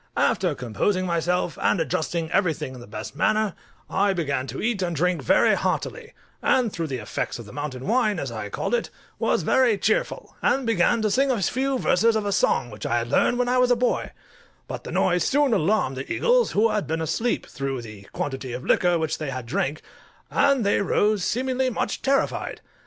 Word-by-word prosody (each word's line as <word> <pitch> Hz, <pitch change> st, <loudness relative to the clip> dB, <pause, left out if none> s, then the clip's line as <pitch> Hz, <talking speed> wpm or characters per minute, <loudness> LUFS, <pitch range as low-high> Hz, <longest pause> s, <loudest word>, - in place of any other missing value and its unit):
After 175 Hz, -6 st, +2 dB
composing 125 Hz, -, -1 dB
myself, 175 Hz, 0 st, -1 dB
and 190 Hz, -, +2 dB
adjusting 160 Hz, 0 st, -2 dB
everything 160 Hz, -8 st, 0 dB
in 125 Hz, -, -10 dB
the 120 Hz, -, -11 dB
best 105 Hz, +1 st, -7 dB
manner, 215 Hz, -3 st, +1 dB, 0.3 s
I 195 Hz, +1 st, +1 dB
began 140 Hz, -7 st, -2 dB
to 130 Hz, +2 st, -6 dB
eat 220 Hz, -3 st, -1 dB
and 175 Hz, -2 st, -1 dB
drink 180 Hz, +3 st, +1 dB
very -, -, +4 dB
heartily; -, -, -2 dB, 0.3 s
and 245 Hz, -5 st, +2 dB
through 165 Hz, -2 st, -3 dB
the 135 Hz, -3 st, -3 dB
effects 105 Hz, -4 st, -4 dB
of 120 Hz, -, -9 dB
the 105 Hz, -, -12 dB
mountain 145 Hz, -3 st, -5 dB
wine, 215 Hz, -1 st, +2 dB
as -, -, -4 dB
I -, -, -5 dB
called -, -, -3 dB
it, 485 Hz, -, 0 dB, 0.3 s
was -, -, +1 dB
very 250 Hz, -5 st, +3 dB
cheerful, -, -, -1 dB
and 270 Hz, -1 st, +1 dB
began 225 Hz, +1 st, +2 dB
to 215 Hz, -, +1 dB
sing 270 Hz, +5 st, +2 dB
a 250 Hz, -4 st, +1 dB
few 260 Hz, +7 st, 0 dB
verses 230 Hz, 0 st, +3 dB
of 215 Hz, -1 st, 0 dB
a 200 Hz, -, 0 dB
song 125 Hz, -, +1 dB
which 105 Hz, -, -9 dB
I 120 Hz, -, +1 dB
had 120 Hz, 0 st, -2 dB
learned 240 Hz, -, +2 dB
when 250 Hz, 0 st, +1 dB
I 250 Hz, +1 st, +2 dB
was 250 Hz, 0 st, +4 dB
a 245 Hz, -, +5 dB
boy: 245 Hz, +1 st, 0 dB, 0.6 s
but -, -, -7 dB
the -, -, -6 dB
noise 180 Hz, -1 st, +2 dB
soon 285 Hz, -3 st, +2 dB
alarmed 180 Hz, -8 st, +1 dB
the 130 Hz, -, -6 dB
eagles, -, -, +2 dB
who 225 Hz, +2 st, +3 dB
had 210 Hz, -, -1 dB
been 160 Hz, +1 st, -1 dB
asleep, 225 Hz, +9 st, -1 dB
through 135 Hz, -3 st, -4 dB
the 105 Hz, -3 st, -11 dB
quantity 135 Hz, -3 st, -4 dB
of 125 Hz, +1 st, -6 dB
liquor 175 Hz, -1 st, +3 dB
which 160 Hz, -2 st, -2 dB
they 155 Hz, -3 st, -3 dB
had 130 Hz, -2 st, -5 dB
drank, 135 Hz, +5 st, -2 dB, 0.5 s
and 275 Hz, -6 st, +3 dB
they 200 Hz, -, +2 dB
rose 205 Hz, 0 st, +1 dB
seemingly 255 Hz, +5 st, 0 dB
much 245 Hz, -, -2 dB
terrified. 275 Hz, 0 st, 0 dB
185 Hz, 205 wpm, -24 LUFS, -, 0.6 s, a